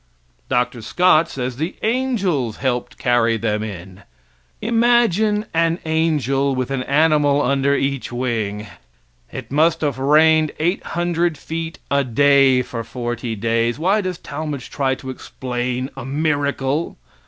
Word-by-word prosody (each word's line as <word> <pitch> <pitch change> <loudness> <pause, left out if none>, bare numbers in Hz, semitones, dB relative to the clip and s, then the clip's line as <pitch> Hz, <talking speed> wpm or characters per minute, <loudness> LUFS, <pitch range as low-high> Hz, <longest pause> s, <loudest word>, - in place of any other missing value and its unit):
Dr. 125 -1 0
Scott 165 +5 +3
says 125 -1 -4
the 160 +5 -3
angels 200 - 0
helped 125 -2 -2
carry 115 -2 +2
them 105 -1 -1
in. 95 -2 -8 0.6
Imagine 225 -3 +2
an 165 0 +2
angel 145 -4 +1
with 130 +1 -2
an 135 -2 -1
animal 145 +1 +3
under 140 +1 +2
each 135 -2 -2
wing. 110 -4 -2 0.7
It - - -8
must 155 +3 +2
have 145 -4 -1
rained 155 +2 +4
800 175 -1 -1
feet 165 +2 -5
a 140 0 +3
day 135 +1 +4
for 115 -2 -6
forty 120 0 -4
days. 115 +2 0
Why 190 +7 +2
does 185 -3 -3
Talmage 145 -5 -6
try 135 -2 0
to 130 0 -7
explain 125 0 -4
a 135 - -7
miracle? 145 +1 -1
140 Hz, 130 wpm, -20 LUFS, 125-160 Hz, 0.7 s, rained